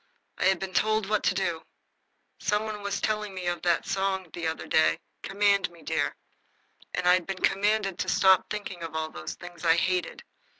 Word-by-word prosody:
I -, -, +1 dB
had 190 Hz, 0 st, +4 dB
been 190 Hz, -1 st, -6 dB
told 215 Hz, 0 st, +2 dB
what 215 Hz, 0 st, +1 dB
to 185 Hz, -, +2 dB
do. 175 Hz, -4 st, -1 dB, 0.8 s
Some 210 Hz, +1 st, +1 dB
one 215 Hz, -1 st, -5 dB
was 200 Hz, 0 st, -2 dB
telling 210 Hz, -2 st, -1 dB
me 185 Hz, -1 st, -5 dB
of 175 Hz, 0 st, -2 dB
a 175 Hz, -1 st, +2 dB
song 190 Hz, -3 st, -1 dB
the 170 Hz, -1 st, -3 dB
other 160 Hz, -, -3 dB
day, 80 Hz, 0 st, +3 dB, 0.2 s
"Command 200 Hz, -1 st, +2 dB
me, 170 Hz, -1 st, -17 dB
dear." -, -, -1 dB, 0.9 s
I 180 Hz, 0 st, +6 dB
had 180 Hz, -2 st, +1 dB
been 195 Hz, -1 st, -3 dB
commanded 195 Hz, -1 st, +1 dB
to -, -, -1 dB
stop 190 Hz, -1 st, +4 dB
thinking 200 Hz, -4 st, -5 dB
of 165 Hz, -1 st, -6 dB
all 160 Hz, 0 st, -2 dB
those 80 Hz, -, -6 dB
things 175 Hz, -1 st, -11 dB
I 165 Hz, -1 st, +5 dB
hated. 180 Hz, 0 st, -1 dB
190 Hz, 195 wpm, -27 LUFS, 175-200 Hz, 0.9 s, I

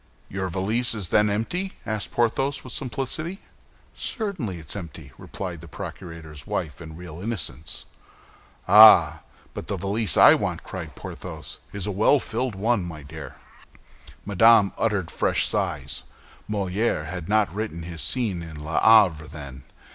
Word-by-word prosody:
"Your 95 Hz, -1 st, -3 dB
valise 110 Hz, +7 st, 0 dB
is 100 Hz, -5 st, -3 dB
then 105 Hz, 0 st, +4 dB
empty?" 175 Hz, -, -2 dB
asked 110 Hz, -2 st, -3 dB
Porthos, 135 Hz, +4 st, +1 dB
with 130 Hz, -, -8 dB
simplicity. 145 Hz, -, -3 dB, 0.5 s
"Certainly 180 Hz, -, -4 dB
it 80 Hz, -3 st, -12 dB
is -, -, -3 dB
empty," 80 Hz, -7 st, -8 dB
replied -, -, -7 dB
the -, -, -11 dB
procurator's 80 Hz, -5 st, -9 dB
wife, 75 Hz, 0 st, -3 dB
in 80 Hz, -1 st, -9 dB
real 85 Hz, -1 st, -9 dB
innocence. 80 Hz, -, -4 dB, 0.8 s
"Ah, 90 Hz, -7 st, +8 dB, 0.3 s
but -, -, -7 dB
the -, -, -2 dB
valise 100 Hz, +1 st, -1 dB
I -, -, +9 dB
want," -, -, -2 dB
cried -, -, -7 dB
Porthos, -, -, -7 dB
"is 100 Hz, -3 st, -4 dB
a 105 Hz, -, -2 dB
well 105 Hz, +9 st, +4 dB
filled 120 Hz, -2 st, -3 dB
one, 105 Hz, +1 st, +1 dB
my 80 Hz, -4 st, -7 dB
dear." 75 Hz, -2 st, -9 dB, 0.9 s
Madame 105 Hz, 0 st, +5 dB
uttered 105 Hz, -7 st, -1 dB
fresh -, -, +2 dB
sighs. 85 Hz, -10 st, -2 dB, 0.5 s
Molière 100 Hz, -4 st, 0 dB
had 90 Hz, +1 st, -6 dB
not 105 Hz, -4 st, +2 dB
written 100 Hz, -5 st, -4 dB
his 85 Hz, -1 st, -5 dB
scene 110 Hz, -9 st, 0 dB
in 80 Hz, -2 st, -8 dB
"L'Avare" 85 Hz, -2 st, +5 dB
then. 70 Hz, -4 st, -9 dB
95 Hz, 145 wpm, -24 LUFS, 80-110 Hz, 0.9 s, I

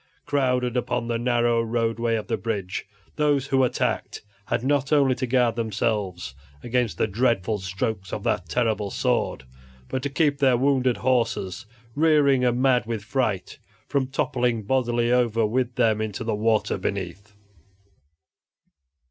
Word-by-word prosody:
Crowded 125 Hz, -3 st, 0 dB
upon 125 Hz, -1 st, -1 dB
the 115 Hz, -1 st, -1 dB
narrow 120 Hz, -1 st, +2 dB
roadway 115 Hz, 0 st, 0 dB
of 110 Hz, -, -3 dB
the 115 Hz, -, -1 dB
bridge, 100 Hz, -3 st, -4 dB, 0.3 s
those 145 Hz, -3 st, +2 dB
who 135 Hz, -1 st, +2 dB
attacked 125 Hz, -, -1 dB, 0.2 s
had -, -, -1 dB
not 140 Hz, +1 st, +1 dB
only 140 Hz, -3 st, +4 dB
to 125 Hz, +1 st, -3 dB
guard 120 Hz, -2 st, +2 dB
themselves 105 Hz, -, -2 dB, 0.3 s
against 120 Hz, -2 st, -1 dB
the -, -, +2 dB
dreadful 110 Hz, -1 st, 0 dB
strokes 95 Hz, +1 st, -3 dB
of 105 Hz, -, -4 dB
that 90 Hz, -3 st, -1 dB
terrible 110 Hz, -3 st, 0 dB
sword, 65 Hz, -, -1 dB, 0.5 s
but 130 Hz, -, -2 dB
to 140 Hz, -, -2 dB
keep 145 Hz, 0 st, +1 dB
their 130 Hz, -3 st, +4 dB
wounded 130 Hz, -1 st, +2 dB
horses 115 Hz, -4 st, -1 dB, 0.3 s
(rearing 145 Hz, -3 st, +3 dB
and 125 Hz, 0 st, +2 dB
mad 125 Hz, -3 st, +3 dB
with 115 Hz, -3 st, -3 dB
fright) 110 Hz, -, -2 dB, 0.3 s
from 140 Hz, -2 st, 0 dB
toppling 125 Hz, -4 st, -1 dB
bodily 120 Hz, 0 st, +1 dB
over 115 Hz, -3 st, +2 dB
with 120 Hz, +2 st, -1 dB
them 110 Hz, -3 st, +2 dB
into 110 Hz, 0 st, -3 dB
the 115 Hz, -1 st, -1 dB
water 110 Hz, -1 st, +1 dB
beneath. 100 Hz, +2 st, -5 dB
120 Hz, 145 wpm, -24 LUFS, 110-130 Hz, 0.5 s, only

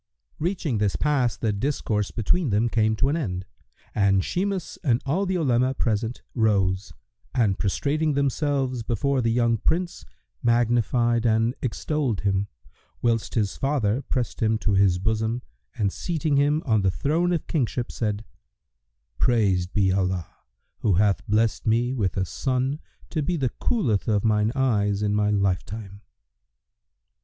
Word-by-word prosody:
Reaching 160 Hz, -, -1 dB
this 105 Hz, -2 st, +1 dB
pass 140 Hz, -5 st, +1 dB
the 110 Hz, -3 st, 0 dB
discourse 105 Hz, -3 st, -1 dB
between 135 Hz, -, 0 dB
them 110 Hz, +3 st, +2 dB
came 110 Hz, -1 st, +2 dB
to 130 Hz, +5 st, +1 dB
an 145 Hz, -, +1 dB
end, 95 Hz, -, -3 dB, 0.5 s
and 100 Hz, -2 st, +3 dB
Shimas 190 Hz, -1 st, -2 dB
and 120 Hz, -5 st, +3 dB
all 180 Hz, +8 st, 0 dB
the 185 Hz, -, 0 dB
Olema 130 Hz, -4 st, +2 dB
present 115 Hz, +1 st, -1 dB
rose 100 Hz, -4 st, +1 dB, 0.4 s
and 110 Hz, -7 st, +2 dB
prostrating 145 Hz, +9 st, 0 dB
themselves 140 Hz, -2 st, 0 dB
before 130 Hz, +4 st, 0 dB
the 115 Hz, -, +1 dB
young 115 Hz, -1 st, +2 dB
Prince, 175 Hz, -, -1 dB, 0.4 s
magnified 120 Hz, 0 st, +2 dB
and 115 Hz, +2 st, +2 dB
extolled 130 Hz, -2 st, -1 dB
him, 100 Hz, 0 st, 0 dB, 0.6 s
whilst 115 Hz, -2 st, 0 dB
his 105 Hz, -4 st, 0 dB
father 135 Hz, -4 st, 0 dB
pressed 125 Hz, -2 st, -3 dB
him 110 Hz, 0 st, +2 dB
to 105 Hz, -1 st, -1 dB
his 95 Hz, -2 st, +4 dB
bosom 110 Hz, +4 st, -1 dB, 0.3 s
and 100 Hz, -3 st, 0 dB
seating 160 Hz, -4 st, -1 dB
him 145 Hz, +3 st, +2 dB
on 110 Hz, -5 st, +2 dB
the 95 Hz, -, +2 dB
throne 160 Hz, -, 0 dB
of 170 Hz, -, -1 dB
kingship, 125 Hz, -5 st, -1 dB
said, 105 Hz, -1 st, -2 dB, 0.9 s
"Praised 100 Hz, -7 st, +2 dB
be 95 Hz, -3 st, +2 dB
Allah 95 Hz, -2 st, -1 dB, 0.5 s
who 105 Hz, -, +2 dB
hath 100 Hz, +1 st, +2 dB
blessed 110 Hz, +2 st, +1 dB
me 120 Hz, +3 st, +2 dB
with 100 Hz, -8 st, -1 dB
a 95 Hz, -, +1 dB
son 130 Hz, -, -1 dB, 0.3 s
to 155 Hz, -, -1 dB
be 170 Hz, +4 st, -1 dB
the 135 Hz, -4 st, 0 dB
coolth 120 Hz, -, 0 dB
of 105 Hz, -2 st, +1 dB
mine 105 Hz, 0 st, +2 dB
eyes 105 Hz, -6 st, +1 dB
in 105 Hz, -1 st, +1 dB
my 105 Hz, 0 st, +2 dB
lifetime!" 100 Hz, 0 st, -2 dB
115 Hz, 150 wpm, -25 LUFS, 105-135 Hz, 0.9 s, his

